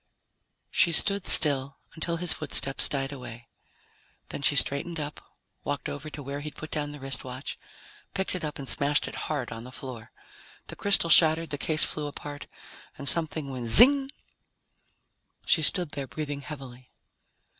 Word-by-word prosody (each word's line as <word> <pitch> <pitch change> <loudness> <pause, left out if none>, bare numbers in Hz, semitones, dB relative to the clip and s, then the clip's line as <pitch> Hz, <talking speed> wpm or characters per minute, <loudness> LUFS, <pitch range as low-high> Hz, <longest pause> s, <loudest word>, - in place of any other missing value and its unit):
She 170 - +4
stood 200 +3 0
still 140 -2 +5 0.2
until 170 +1 -2
his 175 0 +2
footsteps 135 -2 +1
died 135 -1 -3
away. 120 -4 -11 0.8
Then - - -6
she 145 - +3
straightened 155 +4 +1
up, 150 0 -6 0.4
walked 145 -1 -4
over 145 +2 -7
to 145 -1 -9
where 140 +2 -6
he'd 150 +1 -8
put 155 - -9
down 145 -1 -3
the 145 - -11
wristwatch, 130 0 -4 0.6
picked 190 -1 -3
it 185 - -5
up 150 -1 -5
and 140 - -8
smashed 145 +2 +2
it - - -8 0.2
hard 145 -6 -3
on 115 0 -8
the 125 - -11
floor. 125 -4 -9 0.6
The - - -5
crystal 195 -4 +2
shattered, 160 0 +5
the 145 - -3
case 155 +1 +1
flew 150 -1 -3
apart, 145 0 -9 0.5
and 140 - -8
something 155 -3 +2
went 125 -3 -6
zing! 270 - +7 1.4
She 160 - +2
stood 170 +1 +1
there 140 -2 -6
breathing 145 -1 -6
heavily. 130 -3 -11
145 Hz, 160 wpm, -26 LUFS, 135-160 Hz, 1.4 s, zing